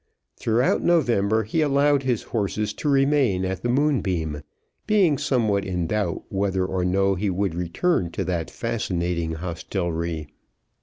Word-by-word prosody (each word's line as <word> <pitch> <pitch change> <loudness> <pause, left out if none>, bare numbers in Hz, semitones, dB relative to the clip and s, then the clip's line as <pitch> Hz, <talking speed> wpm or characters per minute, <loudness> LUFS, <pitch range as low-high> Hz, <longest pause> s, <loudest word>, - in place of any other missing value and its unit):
Throughout 115 +3 +1
November 110 - +2
he 110 +10 -1
allowed 145 -1 +3
his 125 -4 -1
horses 105 -1 -2
to 150 - -2
remain 135 -9 +3
at 95 0 -3
the 120 - -1
Moonbeam, 95 - 0 0.5
being 190 -10 +3
somewhat 115 -9 +1
in 90 -3 -2
doubt 100 -1 -1
whether 95 -1 0
or 95 -1 -1
no 95 +2 +2
he 100 +2 -1
would 95 -1 -1
return 90 - 0
to - - -2
that 85 -3 -2
fascinating 90 -7 -2
hostelrie. 85 -2 -3
100 Hz, 140 wpm, -24 LUFS, 90-130 Hz, 0.5 s, allowed